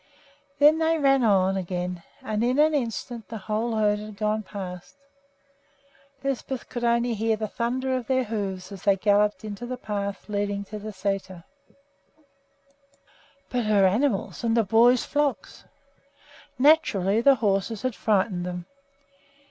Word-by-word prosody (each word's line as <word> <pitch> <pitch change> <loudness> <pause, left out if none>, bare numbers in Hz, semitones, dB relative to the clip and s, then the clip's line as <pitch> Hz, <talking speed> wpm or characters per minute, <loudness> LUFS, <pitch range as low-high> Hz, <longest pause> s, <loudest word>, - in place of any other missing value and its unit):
Then 300 +2 +5
they 325 0 +2
ran 275 -3 +3
on 195 -3 +3
again, 180 -1 -3 0.2
and 215 0 -1
in 250 +2 +1
an 310 +1 +4
instant 235 -3 -3
the 225 - -6
whole 220 +3 -2
herd 210 -1 +2
had 210 -1 -9
gone 215 +1 0
past. 185 -3 -8 1.3
Lisbeth 270 -1 -3
could 240 - -5
only 235 0 +2
hear 220 +1 0
the 215 0 -3
thunder 255 +4 -2
of 255 -3 -4
their 260 -1 +2
hoofs 200 -4 -4
as 195 -2 -9
they 200 -1 +3
galloped 205 +2 +2
into 215 +3 -6
the 255 0 -4
path 200 -3 -4
leading 205 -1 -2
to 210 +1 -8
the 215 +1 -7
sæter. 190 -3 -4 2.1
But 245 -2 0
her 205 -2 +4
animals! 215 +4 0
and 230 0 +1
the 230 - +4
boys' 230 +4 +4
flocks! 285 -9 -2 0.9
Naturally 230 - +3
the 275 +3 +6
horses 205 -1 -1
had 255 -1 0
frightened 195 -4 0
them. 180 -1 -5
215 Hz, 145 wpm, -25 LUFS, 200-245 Hz, 2.1 s, the